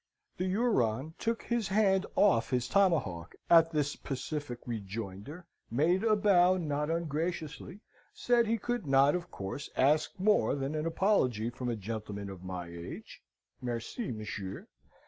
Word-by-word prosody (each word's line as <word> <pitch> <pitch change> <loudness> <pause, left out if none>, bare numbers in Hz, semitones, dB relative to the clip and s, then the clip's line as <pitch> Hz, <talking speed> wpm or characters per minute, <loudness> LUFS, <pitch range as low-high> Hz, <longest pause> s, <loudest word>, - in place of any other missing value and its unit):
"The 185 - -1
Huron 160 - +1
took 230 0 -1
his 235 -4 -1
hand 195 -1 +2
off 190 - +4
his 125 -2 0
tomahawk 140 - +1 0.2
at 165 -1 +7
this 150 -2 -1
pacific 135 -1 -4
rejoinder, 110 - -6 0.2
made 165 - +2
a 220 -2 +4
bow 185 -3 +4
not 150 -3 -1
ungraciously, 165 +3 -3 0.3
said 240 -2 +2
he 230 +1 +1
could 240 -4 -3
not, 135 +1 +5
of 175 0 -3
course, 100 +9 -6
ask 150 +7 +2
more 205 -3 +3
than 140 +1 -3
an 155 +1 -1
apology 130 - +1
from 125 0 -4
a 120 - -1
gentleman 105 -1 -5
of 95 -2 -10
my 90 -1 -5
age 85 0 -9 0.4
(Merci, 120 - -4
monsieur!) 105 -3 -6
150 Hz, 145 wpm, -31 LUFS, 115-185 Hz, 0.4 s, at